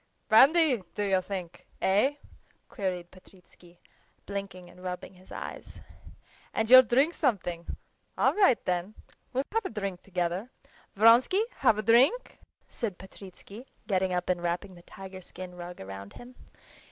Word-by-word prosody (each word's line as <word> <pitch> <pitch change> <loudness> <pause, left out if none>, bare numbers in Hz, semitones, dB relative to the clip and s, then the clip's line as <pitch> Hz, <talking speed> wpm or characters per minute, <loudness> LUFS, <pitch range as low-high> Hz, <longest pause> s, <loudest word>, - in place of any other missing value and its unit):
"Brandy, 270 - +6
do 205 - -1
you 190 -2 +2
think? 185 -3 -7
Eh?" 210 +9 +2 0.5
queried 180 -5 -4
Petritsky, 180 -2 -20 0.5
blinking 195 -2 -6
and 180 +1 -16
rubbing 180 +1 -6
his 185 0 -19
eyes. - - -8 0.7
"And 220 +1 0
you'll 255 0 +12
drink 265 +7 +2
something? 180 - -2 0.4
All - - +3
right 385 - +4
then, 180 +3 -2 0.4
we'll 265 +1 0
have 450 -1 -1
a - - -2
drink 200 -5 -5
together! 180 +3 -3 0.5
Vronsky, 235 - +5
have 225 -6 +3
a 215 - -2
drink?" 260 - +3 0.3
said 210 -7 -5
Petritsky, 195 +5 -13 0.2
getting 190 -2 0
up 180 0 -2
and 180 -1 0
wrapping 175 +3 -3
the 175 - -15
tiger 190 +1 -11
skin 185 0 -10
rug 175 0 -9
round 95 +1 -9
him. 245 +1 -12
195 Hz, 140 wpm, -28 LUFS, 180-235 Hz, 0.7 s, you'll